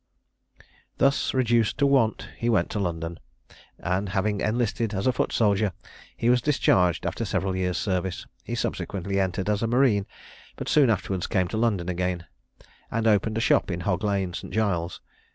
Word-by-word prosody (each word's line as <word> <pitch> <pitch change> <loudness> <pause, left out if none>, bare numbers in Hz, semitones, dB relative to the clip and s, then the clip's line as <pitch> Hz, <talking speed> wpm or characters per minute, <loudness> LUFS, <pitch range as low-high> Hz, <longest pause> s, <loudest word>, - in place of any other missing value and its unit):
Thus 140 +1 +2
reduced 120 -4 +2
to 140 - +3
want, 135 -6 +2
he 120 - -1
went 95 -7 +2
to 105 - -2
London, 85 -3 -3 0.6
and 95 +3 -1
having 100 +1 0
enlisted 115 -1 0
as 95 - -2
a 130 - +4
foot - - -1
soldier, 105 -3 +2 0.4
he 115 - -1
was 125 0 +4
discharged 95 - +2
after - - -2
several 95 -1 -1
years' 90 -1 -1
service. 95 -2 -2 0.2
He - - -4
subsequently 100 0 -2
entered 95 0 -1
as 105 -1 +1
a 115 - +1
marine, 120 -5 +3 0.5
but - - -6
soon 145 -5 +5
afterwards 95 -3 -1
came 90 -2 +1
to 110 - -3
London 105 -7 +1
again, 90 -1 -2 0.6
and 115 0 -1
opened 110 0 +2
a - - 0
shop - - +3
in 90 -1 -3
Hog 90 +1 -1
lane, 100 -3 0
St. - - -7
Giles's. 90 -6 -1
100 Hz, 170 wpm, -26 LUFS, 90-115 Hz, 0.6 s, soon